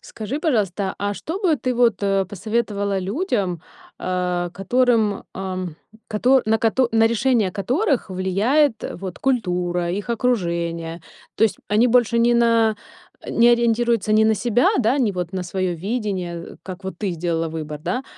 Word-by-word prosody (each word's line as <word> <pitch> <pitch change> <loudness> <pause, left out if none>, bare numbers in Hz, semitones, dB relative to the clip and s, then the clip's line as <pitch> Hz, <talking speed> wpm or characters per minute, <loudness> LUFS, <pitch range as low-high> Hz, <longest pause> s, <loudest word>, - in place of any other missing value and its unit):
Скажи, 220 +6 -5
пожалуйста, 205 - 0
а 205 0 -1
что 325 - -5
бы 350 -7 +2
ты, 255 -1 -2
вот, 235 -4 +2
э, 195 -1 +2
посоветовала 205 0 -2
людям, 195 - -1 0.4
а, 180 -1 -1
которым, 220 +1 +1
ам, 185 -3 -4 0.3
кото 250 +5 +3
на 220 0 +3
кото 235 +3 +2
на 225 0 +5
решение 230 -2 +2
которых 255 - 0
влияет, 215 +8 +1
вот 185 -1 -7
культура, 180 -8 0
их 200 +5 -4
окружение. 170 -8 -1 0.3
То - - -2
есть 220 - 0
они 215 +4 +3
больше 235 -1 +3
не 235 +1 +4
на 230 -2 +3 0.4
э, - - -8
не 235 +1 +4
ориентируются 235 -2 +2
ни 215 0 +5
на 220 0 +4
себя, 240 +2 +2
да, 250 +2 +2
ни 230 -6 +2
вот 180 -2 -4
на 185 -1 -2
своё 180 0 -2
видение, 185 -3 -3
э, - - -13
как 190 0 -9
вот 190 -3 -6
ты 200 -3 -1
сделала 165 -1 -2
выбор, 150 -2 -6
да, 250 - -2
210 Hz, 160 wpm, -21 LUFS, 180-235 Hz, 0.4 s, на